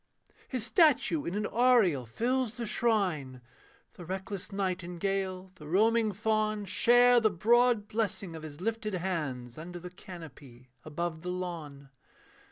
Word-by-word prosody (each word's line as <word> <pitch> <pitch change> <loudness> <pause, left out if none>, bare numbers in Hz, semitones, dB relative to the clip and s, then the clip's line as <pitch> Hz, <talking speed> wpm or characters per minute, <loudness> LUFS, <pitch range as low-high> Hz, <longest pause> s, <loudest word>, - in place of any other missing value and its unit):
His 250 -4 -3
statue 300 +4 +3
in 175 - -3
an 210 0 -1
aureole 215 - +3
fills 240 - -1
the 235 - -3
shrine, 190 - 0 0.5
The 175 - -11
reckless 190 +2 -5
nightingale, 185 0 -2
the 150 -5 -12
roaming 220 +5 +3
fawn, 215 0 0
Share 245 +5 +5
the 220 -2 +3
broad 230 +3 +3
blessing 205 -5 -2
of 160 - -7
his 155 -1 -9
lifted 215 0 -2
hands, 150 -9 -3
Under 175 +2 -7
the 180 +1 -9
canopy, 140 -9 -12
above 160 +1 -4
the 180 - -5
lawn. 160 -7 -6
190 Hz, 135 wpm, -30 LUFS, 165-220 Hz, 0.5 s, Share